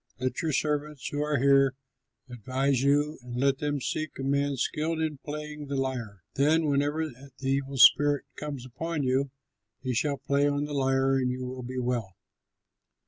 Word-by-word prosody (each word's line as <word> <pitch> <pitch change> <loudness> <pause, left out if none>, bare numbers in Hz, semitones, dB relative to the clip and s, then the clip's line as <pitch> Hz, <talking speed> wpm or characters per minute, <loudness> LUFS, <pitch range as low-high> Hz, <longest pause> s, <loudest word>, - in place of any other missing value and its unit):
Let 130 +5 -1
your 160 -2 0
servants 150 -1 -1
who 145 - -2
are 150 -1 +1
here 135 0 +4 0.5
advise 130 +2 0
you, 145 +2 +2
and 120 -1 -8
let 135 0 +2
them 145 -1 -1
seek 155 +4 -3
a 135 - -4
man 140 +1 +1
skilled 160 +5 -1
in 155 -3 -2
playing 150 0 -6
the 140 - -3
lyre. 120 -8 -3
Then, 155 +4 +3
whenever 145 +2 +1
the 135 0 -13
evil 135 0 -1
spirit 145 +2 +6
comes 140 -4 -6
upon 155 +4 -3
you, 135 +2 +1 0.5
he 130 -1 -1
shall 140 +4 0
play 140 +1 +1
on 145 0 0
the 150 - -6
lyre, 135 -1 +2
and 125 -1 +1
you 125 0 -3
will 130 0 -6
be 130 +1 -6
well." 120 -6 -2
140 Hz, 175 wpm, -28 LUFS, 130-150 Hz, 0.5 s, spirit